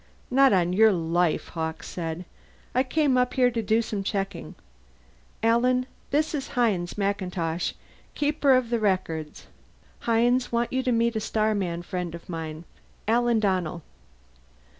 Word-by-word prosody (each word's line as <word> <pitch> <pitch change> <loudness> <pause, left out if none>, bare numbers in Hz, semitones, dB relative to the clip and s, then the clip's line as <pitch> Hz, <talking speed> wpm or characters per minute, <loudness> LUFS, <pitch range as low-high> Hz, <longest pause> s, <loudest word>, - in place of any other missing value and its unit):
"Not 270 +1 +6
on 180 -2 +2
your 220 +3 +6
life," 170 -1 0
Hawkes 160 -1 -4
said. 170 0 -5 0.5
"I 255 - +3
came 270 -1 +2
up 250 0 0
here 250 -1 +4
to 230 -1 -1
do 220 +2 +2
some 210 -3 -3
checking. 195 -2 -3 0.9
Alan, 250 +3 +3 0.2
this 305 +3 +1
is 280 -3 -3
Hines 200 -8 +1
MacIntosh, 180 -4 -1 0.4
Keeper 290 -2 +3
of 250 -2 0
the 235 - +2
Records. 165 -7 -2 0.5
Hines, 240 +2 +2
want 235 +1 0
you 260 - +1
to 255 -1 0
meet 235 0 +2
a - - +1
starman 205 -6 -1
friend 175 -1 -4
of 170 - -12
mine. 160 -2 -5 0.4
Alan 235 0 +3
Donnell." 180 -5 -1
215 Hz, 140 wpm, -26 LUFS, 175-245 Hz, 0.9 s, Not